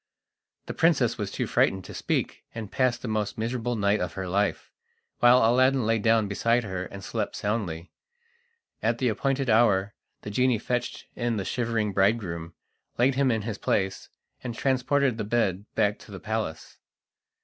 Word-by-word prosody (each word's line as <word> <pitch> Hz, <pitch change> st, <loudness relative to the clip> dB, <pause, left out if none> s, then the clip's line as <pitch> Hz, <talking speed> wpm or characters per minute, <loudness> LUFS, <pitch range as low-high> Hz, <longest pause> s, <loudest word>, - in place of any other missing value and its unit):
The -, -, -5 dB
princess -, -, +2 dB
was -, -, -2 dB
too -, -, -2 dB
frightened 95 Hz, -1 st, +1 dB
to -, -, -9 dB
speak, -, -, -2 dB
and 110 Hz, -4 st, -6 dB
passed 130 Hz, -2 st, +1 dB
the -, -, -3 dB
most 110 Hz, -2 st, -2 dB
miserable 120 Hz, +1 st, -2 dB
night 100 Hz, 0 st, +2 dB
of -, -, -3 dB
her 95 Hz, -1 st, -4 dB
life, 100 Hz, +3 st, -1 dB, 0.5 s
while 120 Hz, -1 st, +6 dB
Aladdin 130 Hz, +1 st, +3 dB
lay 115 Hz, 0 st, +2 dB
down 110 Hz, 0 st, +3 dB
beside 115 Hz, +4 st, +1 dB
her 95 Hz, -3 st, -4 dB
and 100 Hz, 0 st, -9 dB
slept -, -, -3 dB
soundly. 95 Hz, -6 st, -3 dB, 0.9 s
At 115 Hz, +1 st, +1 dB
the 125 Hz, -1 st, +1 dB
appointed 135 Hz, +4 st, -1 dB
hour 105 Hz, -3 st, +3 dB, 0.3 s
the 105 Hz, -, -6 dB
genie 125 Hz, +2 st, +2 dB
fetched 120 Hz, +2 st, -3 dB
in 120 Hz, -2 st, -1 dB
the 95 Hz, -, -3 dB
shivering 115 Hz, -3 st, -1 dB
bridegroom, 95 Hz, -5 st, 0 dB, 0.4 s
laid 130 Hz, +3 st, +3 dB
him 135 Hz, 0 st, +2 dB
in 110 Hz, -3 st, 0 dB
his 110 Hz, -2 st, -4 dB
place, 95 Hz, -1 st, -1 dB, 0.3 s
and 120 Hz, -2 st, -4 dB
transported 130 Hz, -1 st, +1 dB
the -, -, 0 dB
bed 105 Hz, -3 st, 0 dB
back 105 Hz, 0 st, +1 dB
to -, -, -14 dB
the 95 Hz, -, -7 dB
palace. 110 Hz, -7 st, -4 dB
110 Hz, 170 wpm, -26 LUFS, 100-120 Hz, 0.9 s, while